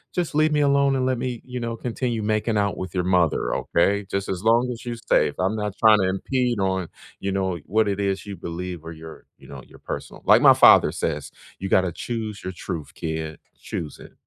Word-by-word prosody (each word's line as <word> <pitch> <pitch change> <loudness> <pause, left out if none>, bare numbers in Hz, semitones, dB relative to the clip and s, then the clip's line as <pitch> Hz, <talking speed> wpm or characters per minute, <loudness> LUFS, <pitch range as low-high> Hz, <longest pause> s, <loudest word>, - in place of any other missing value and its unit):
Just 175 -3 -1
leave 155 +1 +3
me 150 -1 +2
alone 140 -1 +3
and 130 -1 0
let 130 -2 0
me, 125 -1 -3
you 125 -1 -5
know, 115 -1 -4
continue 120 -1 -3
making 110 +1 0
out 100 -1 +1
with 95 -1 -6
your 90 - +1
mother. 90 -3 +1
Okay, 100 +4 +1
just 100 0 -2
as 90 -2 -3
long 115 +3 +4
as 120 - -11
you 120 -2 -4
safe. 75 - +3
I'm 95 +4 +1
not 105 -2 -3
trying 110 -2 +6
to 95 -1 +1
impede 120 +4 -1
on, 95 -2 -1 0.3
you 100 - -2
know, 95 -2 -1
what 110 +1 +2
it 100 -1 -1
is 100 -1 -1
you 100 -1 -6
believe 85 0 -6
or 80 - -7
your, 80 0 -11
you - - -17
know, - - -9
your - - -16
personal" - - -7
like - - +6
my - - +8
father - - +7
says, 75 -3 -3 0.3
"You 95 - -4
gotta 95 -2 +3
choose 110 +2 -5
your 95 - -5
truth, 80 -3 -6
kid. 80 -1 -4 0.2
Choose 80 -3 -6
it." - - -13
100 Hz, 225 wpm, -23 LUFS, 90-120 Hz, 0.3 s, my